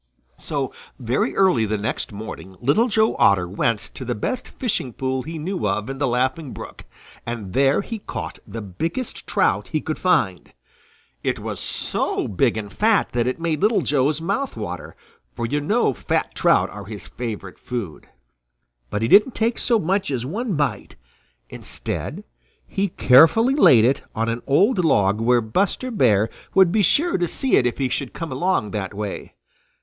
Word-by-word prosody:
So - - -2 0.2
very 125 +2 -1
early 180 - +3
the 110 +1 -1
next 110 +3 -3
morning 100 -2 -8
Little 150 - +3
Joe 220 -1 +2
Otter 95 -3 +4
went 105 +4 0
to - - -7
the 120 -1 -2
best 250 - -3
fishing 200 - -3
pool 130 +1 -2
he 160 +4 -6
knew 175 - -2
of 105 +5 -2
in 135 - -7
the 145 - +1
Laughing 130 +4 -1
Brook, - - -10 0.4
and 115 -5 -6
there 135 +4 +3
he 225 +2 -6
caught - - -6
the 115 -2 -6
biggest 165 - -4
trout - - +1
he 155 - -1
could 155 +1 -4
find. 105 - +1 0.7
It - - -1
was - - -5
so - - -1
big 110 +3 +1
and 105 -2 -6
fat 220 0 +2
that 120 0 0
it 130 - -2
made 165 -3 -1
Little 215 +2 +3
Joe's 145 +1 +1
mouth 200 +12 -2
water, - - -6 0.4
for 120 - -2
you 145 +5 -1
know 205 - +2
fat - - -2
trout - - +3
are 100 -1 -8
his 105 0 -8
favorite 110 -6 -6
food. 110 -11 -6 0.8
But 105 - -2
he - - +2
didn't 210 - +5
take 230 +1 0
so 235 - +3
much 195 +1 0
as 125 -3 -2
one 210 - -2
bite. 140 -9 -2 0.5
Instead - - -5 0.4
he 200 +1 -1
carefully 165 - +5
laid 125 - +6
it 135 +3 +2
on 115 +1 0
an 115 +1 -2
old 185 - +3
log 105 -8 +2
where 120 +1 +3
Buster 195 - -1
Bear 110 - +3 0.3
would 190 -3 +6
be 215 +2 +3
sure 295 - +2
to 175 - +1
see 265 +9 +1
it 125 - +4
if 120 - -3
he 135 - 0
should 130 +1 -3
come 165 -2 -5
along 130 - 0
that 100 -2 -4
way. 105 -1 -5
135 Hz, 175 wpm, -22 LUFS, 110-190 Hz, 0.8 s, laid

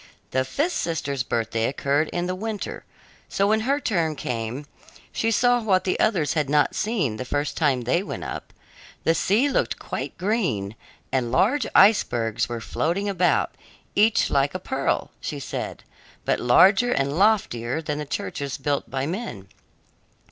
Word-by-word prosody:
The 130 0 +2
fifth 295 - -1
sister's 145 -5 -2
birthday 115 -1 -1
occurred 140 +3 0
in 175 0 -1
the 180 - -1
winter, 210 +2 -5 0.4
so 195 - +1
when 215 +2 +3
her 275 +6 +1
turn 170 - 0
came 120 +2 -4 0.5
she 225 - 0
saw 245 +2 +3
what 195 -4 +2
the 185 - -1
others 170 -9 +2
had 150 -4 0
not 150 0 +3
seen 195 - -1
the 130 - -3
first 145 +3 -2
time 140 -6 +2
they 125 +9 +1
went 200 - -6
up. - - -6 0.5
The 165 - +3
sea 210 - +2
looked 285 - 0
quite - - -5
green, 175 - -1 0.4
and 125 -3 0
large 225 - +2
icebergs 120 - +4
were 120 -1 -3
floating 175 - -1
about, 185 -3 +1 0.4
each 215 +2 +3
like 140 0 +2
a - - -1
pearl, - - -1
she - - -4
said, - - -5 0.4
but - - +1
larger 195 - +5
and 140 - 0
loftier 160 - +2
than 150 -2 -3
the 150 - -4
churches 140 -1 -4
built 140 +1 -2
by 135 0 -2
men. 160 - -5
160 Hz, 160 wpm, -24 LUFS, 130-205 Hz, 0.5 s, larger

